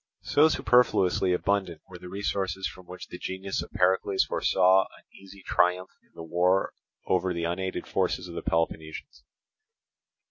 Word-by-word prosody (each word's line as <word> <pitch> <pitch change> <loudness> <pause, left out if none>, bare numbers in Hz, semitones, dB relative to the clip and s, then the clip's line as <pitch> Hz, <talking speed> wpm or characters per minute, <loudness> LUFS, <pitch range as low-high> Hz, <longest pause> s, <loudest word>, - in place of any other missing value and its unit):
So 155 +2 +4
superfluously 105 - +3
abundant 90 -2 -1
were 90 -2 -11
the 90 - -10
resources 95 -1 -2
from 90 -1 -12
which 90 - -10
the 90 - -8
genius 95 +1 -4
of - - -9
Pericles 95 +1 +2
foresaw 95 +1 +3
an - - -21
easy 95 0 -15
triumph 90 +1 +1
in - - -33
the 80 - -8
war 90 +3 +1 0.3
over 95 -1 0
the 85 - -3
unaided 95 +3 -3
forces 90 - -1
of 85 - -9
the 85 - -5
Peloponnesians. 80 - -3
95 Hz, 150 wpm, -27 LUFS, 90-95 Hz, 0.3 s, So